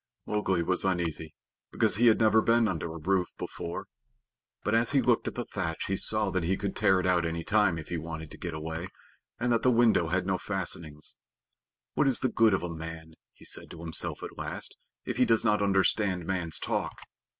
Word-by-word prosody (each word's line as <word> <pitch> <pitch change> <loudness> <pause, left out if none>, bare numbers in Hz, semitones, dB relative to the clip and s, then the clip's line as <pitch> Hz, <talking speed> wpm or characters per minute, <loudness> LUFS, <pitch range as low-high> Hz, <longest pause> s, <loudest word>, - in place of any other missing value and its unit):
Mowgli 95 -5 0
was 90 +2 0
uneasy, 85 -4 -1 0.4
because 95 - +3
he 120 +2 +5
had 110 - +5
never 110 0 +5
been 115 0 +3
under 85 -4 -3
a 80 - -7
roof 90 +3 +1
before. 85 0 -5 0.8
But 105 - 0
as 115 +3 +3
he 140 - +5
looked 120 -3 +2
at - - -4
the 120 - -3
thatch, 85 -5 -3
he 95 - -1
saw 105 +1 +1
that 95 -2 -1
he 95 +3 0
could 100 -2 -3
tear 95 -1 +3
it 95 - -2
out 90 -2 +3
any 85 0 -2
time 105 -4 +2
if 80 - -8
he 85 - -2
wanted 80 -1 -6
to - - -9
get 85 -2 -5
away, 80 +3 -4 0.5
and 120 +1 0
that 115 -1 +3
the 125 - +4
window 115 -8 +4
had 90 +2 0
no 95 -1 0
fastenings. 85 -6 -4 0.8
"What 145 - +2
is 130 - +4
the 130 - +2
good 115 -3 +4
of 95 - -3
a 85 -1 -4
man," 80 0 -8 0.2
he - - -17
said - - -4
to 85 - -10
himself 85 -1 -5
at - - -8
last, - - -5 0.3
"if - - -3
he - - +5
does 115 0 +3
not 105 -2 +3
understand 95 -2 +2
man's 85 -3 0
talk? - - -2
95 Hz, 215 wpm, -29 LUFS, 85-110 Hz, 0.8 s, he